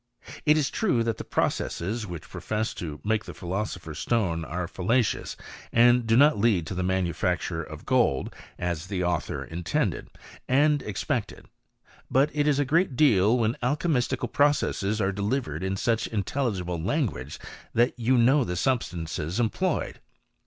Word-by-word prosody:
It 150 +1 +6
is 145 -3 +1
true 155 - +1
that 115 -1 -1
the - - -4
processes 105 +6 -1
which 85 -3 -7
profess 110 +1 -3
to 75 -4 -6
make 110 0 0
the - - -9
philo 95 +3 -2
sopher's 80 -6 -7
stone, 95 -9 0
are 85 +2 -3
fallacious, 105 +4 0 0.3
and 120 0 +5
do 115 +1 +4
not 145 -2 +5
lead 100 -7 +2
to 80 - -5
the 90 - -2
manufacture 90 -2 -1
of 80 -1 -9
gold, 120 - +1 0.2
as 85 -1 -3
the 95 -2 -2
author 85 -1 -1
intended, 85 0 -2 0.4
and 145 +2 +4
ex< 105 -3 -4
pected: - - -3 0.6
but 140 +4 +3
it 150 0 +1
is 145 -2 +3
a 145 - +2
great 155 0 +2
deal 115 -5 +4
when 115 -1 +1
alchymistical 125 -3 0
processes 110 -8 +2
are 95 -1 +1
delivered 100 - -2
in 95 0 -1
such 115 +2 0
intelligible 100 -5 -2
languagis 85 - -2 0.4
that 120 +2 +3
you 125 +2 +3
know 130 +4 +5
the 90 -6 -3
substances 85 - -2
employed. 115 -2 -1
110 Hz, 155 wpm, -26 LUFS, 90-125 Hz, 0.6 s, It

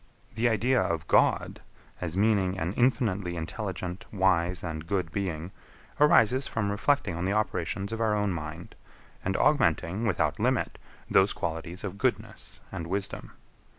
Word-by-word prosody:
The 115 +2 +2
idea 120 +3 +2
of 80 -2 -2
God, - - +2 0.4
as 85 0 -3
meaning 100 -3 +2
an 90 +1 -2
infinitely 105 -7 +1
intelligent, 90 +1 -5
wise, 90 -3 +1
and 80 -2 -5
good 90 -4 -1
Being, 90 -2 -3 0.5
arises 130 -3 +5
from 105 -3 -1
reflecting 105 - +1
on 85 +2 -2
the 95 - +1
operations 100 -1 -1
of 115 - -3
our 110 -2 +2
own 105 -2 0
mind, 85 +1 -7 0.5
and 95 +1 0
augmenting, 105 - +2
without 95 - 0
limit, - - 0 0.3
those 95 +1 +4
qualities 85 +3 -4
of 100 -1 -5
goodness - - -2
and 80 - -5
wisdom. 95 +2 -3
95 Hz, 145 wpm, -28 LUFS, 85-110 Hz, 0.5 s, arises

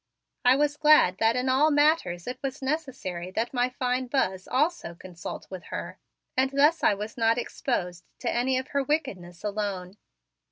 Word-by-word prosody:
I 250 +1 +6
was 290 +1 +1
glad 300 -12 +5
that 225 +1 +3
in 250 +1 -1
all 265 +4 +4
matters 290 - +2
it 250 - -5
was 275 0 -4
necessary 265 - -3
that 225 +7 -2
my 245 0 +1
fine 255 0 -1
Buzz 190 -8 -1
also 290 - 0
consult 175 -1 -8
with 185 -2 -7
her - - -6 0.4
and 265 +1 +2
thus 290 +4 +3
I 205 - +4
was 210 +4 -7
not 230 0 +3
exposed 180 -8 -3 0.2
to - - -1
any 255 +2 +1
of 260 0 -4
her 280 - 0
wickedness 205 - -3
alone. 200 -2 -3
250 Hz, 170 wpm, -27 LUFS, 190-275 Hz, 0.4 s, I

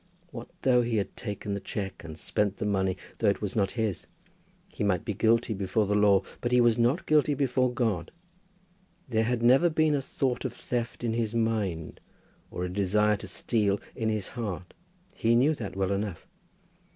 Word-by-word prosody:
What 120 -4 -8
though 125 -2 +5
he 120 -1 -1
had 100 - -2
taken 105 -2 -5
the 100 - -2
cheque, 100 -1 -5
and 80 -1 -8
spent 100 +4 -1
the - - -3
money 95 -2 0 0.2
though 110 - +3
it 100 - 0
was 105 -3 -4
not 100 -3 +2
his? 110 -5 -2 0.6
He - - -5
might 95 -4 +1
be 105 - -1
guilty 115 +2 +2
before 100 +2 0
the 100 - 0
law, 105 -2 +4 0.2
but 120 - -1
he 125 - +5
was 120 -2 +5
not 120 +8 +1
guilty 150 -1 +3
before 130 -2 +1
God. 110 -9 -1 1.0
There 110 -2 +2
had 120 0 -1
never 135 +8 +6
been 155 -1 +2
a 140 - +1
thought 130 -1 -2
of - - -3
theft 120 -1 -4
in 115 -2 0
his 115 -1 -1
mind, 105 -8 -1 0.5
or 90 - -4
a - - -1
desire 105 +2 +2
to 100 - -8
steal 100 +1 0 0.2
in 110 -1 -1
his 105 -3 -2
heart. 100 -8 -5 0.4
He 115 +1 +2
knew 135 +6 +4
that 100 -10 -6
well 95 0 0
enough. 100 -3 -3
110 Hz, 190 wpm, -28 LUFS, 100-120 Hz, 1.0 s, never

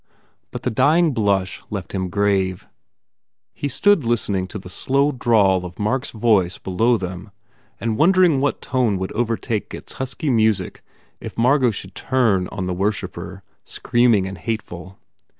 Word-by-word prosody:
But - - -7
the - - 0
dying 160 +8 +3
blush 100 -5 0
left 100 -4 -5
him 95 -2 -2
grave. 95 -1 0 0.9
He 145 - -3
stood 200 +5 +3
listen 115 -3 0
ing 95 -1 -1
to 105 - -7
the 95 - -10
slow 140 +9 +1
drawl 105 -8 +2
of 90 0 -8
Mark 120 +5 -1
s - - -4
voice 105 -6 +1
below 115 +6 +1
them 95 +1 -6 0.5
and 115 -1 -2
wondering 175 -4 +4
what 145 - -1
tone 125 -6 +1
would 95 0 -4
overtake 115 -1 -2
its - - -10
husky 130 +3 -2
music 110 -3 +1 0.4
if - - -9
Margot 125 +2 +3
should 95 -3 -7
turn 110 -9 +1
on 95 -3 -5
the 90 - -2
wor 100 +4 +1
shipper, 95 -1 -8 0.2
screaming 120 -5 +2
and 95 -1 -7
hateful. 95 -2 -5
105 Hz, 160 wpm, -21 LUFS, 95-125 Hz, 0.9 s, wondering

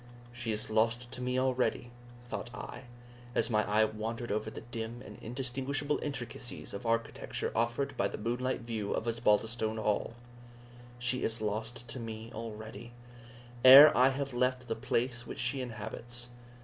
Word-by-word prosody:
"She 120 -2 -3
is 110 0 -3
lost 115 +2 +2
to 125 - -4
me 125 0 0
already," 130 -2 0 0.4
thought 120 - -4
I, 130 - -7 0.5
as - - +2
my 105 -1 +3
eye 110 +1 +5
wandered 115 +2 -4
over 110 +1 -1
the - - -8
dim 120 0 -6
and - - -10
indistinguishable 135 +4 -2
intricacies 125 -3 -5
of 100 +4 -5
architecture 115 0 -1
offered 120 +5 0
by 100 - +2
the - - -6
moonlight 125 +4 -1
view 110 -3 -3
of - - -2
Osbaldistone 110 0 +1
Hall 105 +1 0 0.8
"She 120 +1 -1
is 115 +1 -1
lost 110 +3 -3
to 130 - -4
me 115 0 -6
already, 110 +1 -7 0.7
ere 135 +4 +11
I 130 +1 +6
have 135 0 -3
left 125 0 +1
the 115 - -1
place 120 +1 -1
which - - -6
she 130 +2 -1
inhabits! 120 +1 -6
120 Hz, 155 wpm, -32 LUFS, 110-125 Hz, 0.8 s, ere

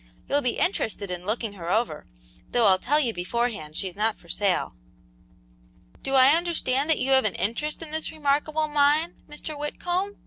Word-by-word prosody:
You'll 285 +1 +2
be 250 -3 -1
interested 215 - -1
in 180 +1 -6
looking 220 -1 -2
her 175 -4 -6
over, 215 -6 0 0.4
though 240 -2 +2
I'll 190 -2 +5
tell 290 +8 +2
you 245 -6 0
beforehand 180 -4 -2
she's 185 0 -2
not 215 +2 0
for 170 - -20
sale." 195 - 0 1.3
"Do 270 - -1
I 260 0 +7
understand 325 -5 0
that 320 - +4
you 270 - -1
have 265 0 +6
an 210 - 0
interest 300 +10 -2
in 310 - -9
this 315 0 -3
remarkable 305 +1 0
mine, 295 +2 +2
Mr. 300 +1 -5
Whitcomb?" 355 +7 -2
260 Hz, 175 wpm, -26 LUFS, 205-300 Hz, 1.3 s, I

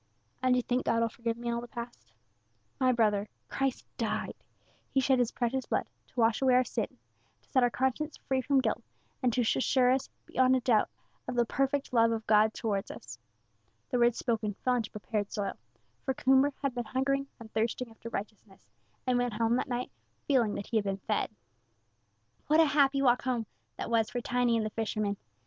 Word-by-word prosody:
"And 255 -1 +4
you 250 - +1
think 250 +1 0
God 230 - +3
will 230 - +2
forgive 230 0 -3
me 240 0 -3
all 235 0 -1
the 240 - -8
past?" 240 -1 -8 0.7
"My 255 -1 +4
brother, 210 -3 +2 0.2
Christ 270 -2 -1
died - - -2 0.6
He 270 - +2
shed 265 0 +3
His 245 -2 +2
precious 255 +2 -1
blood, - - 0 0.2
to - - -7
wash 225 +1 +3
away 260 -2 +5
our 255 - +5
sin, 225 - -3 0.5
to - - -31
set 260 - +4
our 245 - +4
conscience 265 +5 -1
free 265 -1 -1
from 275 0 +3
guilt, - - -1 0.4
and 250 -2 +3
to 245 - +1
assure 250 +2 +3
us 260 0 0 0.2
beyond 260 0 +3
a - - +3
doubt 230 -3 +3 0.4
of 255 - -3
the 240 -1 +3
perfect 275 +2 -1
love 230 -1 +5
of 225 -1 -2
God 215 0 +5
towards 200 -3 -2
us." 115 - -9 0.7
The 250 - +1
words 240 -1 +4
spoken 220 -4 -1
fell 255 - +4
into 225 -3 -2
prepared 210 0 -3
soil, 200 -2 -2 0.5
for 265 - -1
Coomber 270 +3 +4
had 275 -2 0
been 240 -1 -3
hungering 275 +3 0
and 225 -1 -12
thirsting 230 +2 -1
after 225 +1 -9
righteousness, 200 -2 -8 0.3
and 255 -1 +2
he - - +2
went 245 -2 0
home 225 +2 +2
that - - -1
night 245 0 -2 0.4
feeling 240 -7 +3
that 200 - -4
he 230 - 0
had 215 - +2
been 195 -1 -2
fed. 195 - -1 1.2
What 310 +2 +4
a 325 - +7
happy 275 -1 +3
walk 245 -2 +4
home 245 -3 -1 0.3
that - - -4
was 225 -1 +3
for 245 - -2
Tiny 245 -1 +1
and 220 - 0
the 215 - -3
fisherman! 215 -2 -1
240 Hz, 205 wpm, -30 LUFS, 225-260 Hz, 1.2 s, a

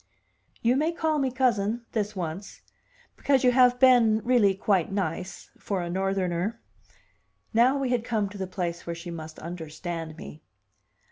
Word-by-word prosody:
'" - - -36
"You 250 +2 +4
may 310 +4 +1
call 315 -2 0
me 270 -2 +1
cousin 235 -3 0
this 210 -1 -2
once 180 +2 -6 0.6
because 275 -2 +2
you 250 - +5
have 250 0 +4
been, 240 -4 +5
really, 230 -6 +3
quite 190 -3 +1
nice 185 -2 -4
for 190 -3 -2
a 170 - -4
Northerner." 190 +2 -1 0.9
Now 245 +5 +4
we 270 -2 -1
had 240 -2 +1
come 220 -4 -1
to 205 - -10
the 190 - -3
place 175 -3 -4
where 170 - -3
she 170 +1 -8
must 160 -1 -8
understand 165 -1 -6
me. 155 -1 -10
200 Hz, 160 wpm, -26 LUFS, 175-245 Hz, 0.9 s, you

